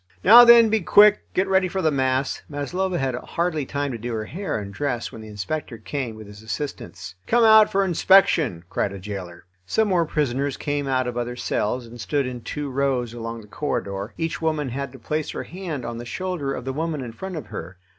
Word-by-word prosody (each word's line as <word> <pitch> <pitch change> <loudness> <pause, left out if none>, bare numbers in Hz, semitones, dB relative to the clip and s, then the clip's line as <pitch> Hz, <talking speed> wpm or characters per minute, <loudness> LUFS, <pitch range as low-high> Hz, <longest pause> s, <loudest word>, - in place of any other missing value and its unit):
"Now, 235 +4 +10
then, 235 -1 +8
be 220 - +3
quick; 210 +4 +6
get 190 +1 +2
ready 190 -1 +3
for 190 +1 -3
the 155 - +3
mass." 130 -1 0
Maslova 180 +6 -2
had 135 -4 -1
hardly 155 +3 -2
time 145 0 -2
to 120 - -5
do 120 +2 -4
her 110 -1 -3
hair 185 - -4
and 100 -2 -6
dress 130 -4 -2
when 110 - -10
the 110 - -10
inspector 110 +5 -5
came 120 +1 -4
with 110 0 -10
his 105 0 -12
assistants. 110 - -6
"Come 240 0 +4
out 220 -1 +7
for 195 -1 +2
inspection," 165 - +3
cried 100 - -2
a - - -6
jailer. 95 -3 -7 0.2
Some 220 - +1
more 175 -3 +2
prisoners 140 -3 -1
came 145 -1 -2
out 130 -1 +1
of 125 -1 -4
other 120 0 -3
cells 125 0 -2
and 115 0 -10
stood 140 +3 0
in 125 -1 -5
two 145 +3 -5
rows 130 -3 0
along 115 -1 -6
the 105 - -15
corridor; 100 -4 -4
each 165 0 -3
woman 155 -4 0
had 140 +2 -4
to - - -10
place 155 +5 -3
her - - -4
hand 170 -8 -6
on 115 0 -5
the 120 - -7
shoulder 180 -1 -3
of 130 -2 -5
the 135 - -3
woman 155 0 -2
in 120 - -6
front 190 +10 -7
of 155 - -5
her. 90 +3 -7
140 Hz, 220 wpm, -23 LUFS, 115-170 Hz, 0.2 s, Now